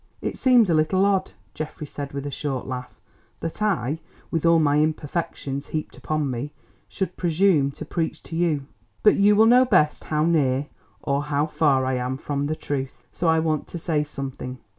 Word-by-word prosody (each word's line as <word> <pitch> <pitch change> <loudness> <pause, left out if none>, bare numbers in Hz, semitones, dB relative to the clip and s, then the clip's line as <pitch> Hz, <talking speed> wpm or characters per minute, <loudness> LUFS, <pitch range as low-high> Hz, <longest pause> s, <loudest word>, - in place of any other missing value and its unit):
"It - - -3
seems 250 -5 +5
a 170 - +2
little 160 +5 +3
odd," 195 -2 +1 0.2
Geoffrey 155 0 -6
said 145 -1 -6
with 140 0 -5
a 145 - -3
short 135 -2 -3
laugh, 125 -1 -6 0.4
"that 165 +5 -5
I, 160 - 0 0.3
with 165 0 +1
all 165 0 +6
my 150 -2 +3
imperfections 150 -2 -2
heaped 155 -1 -4
upon 155 -3 -2
me, 125 +4 -4 0.4
should 185 -2 -3
presume 170 -4 +3
to - - -8
preach 165 -2 -3
to 165 - -8
you—but 165 +4 0
you 205 +1 +5
will 220 +2 +6
know 245 +3 +7
best 185 -11 +2
how 155 0 +1
near 145 -5 +2 0.4
or 140 +1 0
how 145 0 +1
far 145 -4 +2
I 130 0 0
am 125 +1 -2
from 145 0 -2
the 155 - -1
truth. 135 -5 -5
So 175 - -2
I 160 0 +4
want 160 -2 0
to - - -6
say 160 -3 0
something. 135 -3 -6
155 Hz, 185 wpm, -24 LUFS, 140-170 Hz, 0.4 s, know